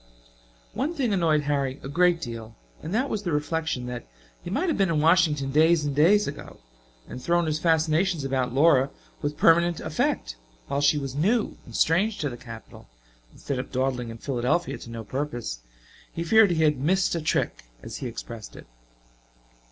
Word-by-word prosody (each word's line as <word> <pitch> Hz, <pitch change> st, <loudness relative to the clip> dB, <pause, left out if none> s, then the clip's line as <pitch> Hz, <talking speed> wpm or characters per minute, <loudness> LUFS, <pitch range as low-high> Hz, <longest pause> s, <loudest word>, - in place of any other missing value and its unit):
One 300 Hz, +6 st, -2 dB
thing 250 Hz, -8 st, 0 dB
annoyed 165 Hz, -5 st, +2 dB
Harry 140 Hz, -2 st, -1 dB
a -, -, -5 dB
great 175 Hz, +4 st, +3 dB
deal; 115 Hz, -3 st, -7 dB, 0.3 s
and 160 Hz, -, -6 dB
that 245 Hz, +7 st, +1 dB
was 215 Hz, -6 st, -2 dB
the 180 Hz, -4 st, -3 dB
reflection 150 Hz, -2 st, -1 dB
that 125 Hz, -, -6 dB, 0.3 s
he -, -, -7 dB
might 280 Hz, -, 0 dB
have 325 Hz, -, +1 dB
been 195 Hz, -3 st, +2 dB
in 160 Hz, -2 st, +1 dB
Washington 155 Hz, -4 st, +3 dB
days 160 Hz, +2 st, +4 dB
and 145 Hz, -2 st, -2 dB
days 195 Hz, +8 st, +4 dB
ago 140 Hz, -, -8 dB, 0.5 s
and 125 Hz, -, -8 dB
thrown 170 Hz, +4 st, +1 dB
his 155 Hz, -1 st, -1 dB
fascinations 160 Hz, +1 st, +2 dB
about 130 Hz, -2 st, -1 dB
Laura 135 Hz, 0 st, +4 dB, 0.3 s
with 145 Hz, 0 st, -3 dB
permanent 170 Hz, 0 st, +4 dB
effect -, -, -2 dB, 0.3 s
while 140 Hz, -, -2 dB
she 145 Hz, +1 st, +4 dB
was 135 Hz, -3 st, -4 dB
new 210 Hz, -, +1 dB
and 120 Hz, -, -10 dB
strange 200 Hz, +7 st, +2 dB
to 150 Hz, -6 st, -2 dB
the -, -, -6 dB
capital, 115 Hz, -, -12 dB, 0.4 s
instead 135 Hz, -2 st, -4 dB
of 130 Hz, -, -6 dB
dawdling 130 Hz, -2 st, -1 dB
in 115 Hz, -, -8 dB
Philadelphia 130 Hz, +7 st, -1 dB
to -, -, -10 dB
no 115 Hz, -1 st, -6 dB
purpose. 120 Hz, -, -4 dB, 0.5 s
He 165 Hz, -, -4 dB
feared 220 Hz, +4 st, +5 dB
he 160 Hz, -2 st, +1 dB
had 150 Hz, -3 st, +2 dB
"missed 185 Hz, +7 st, +1 dB
a 170 Hz, -, -1 dB
trick," 155 Hz, -, -1 dB, 0.2 s
as -, -, -7 dB
he 130 Hz, -, -4 dB
expressed 115 Hz, -2 st, -8 dB
it. -, -, -11 dB
150 Hz, 185 wpm, -25 LUFS, 130-170 Hz, 0.5 s, feared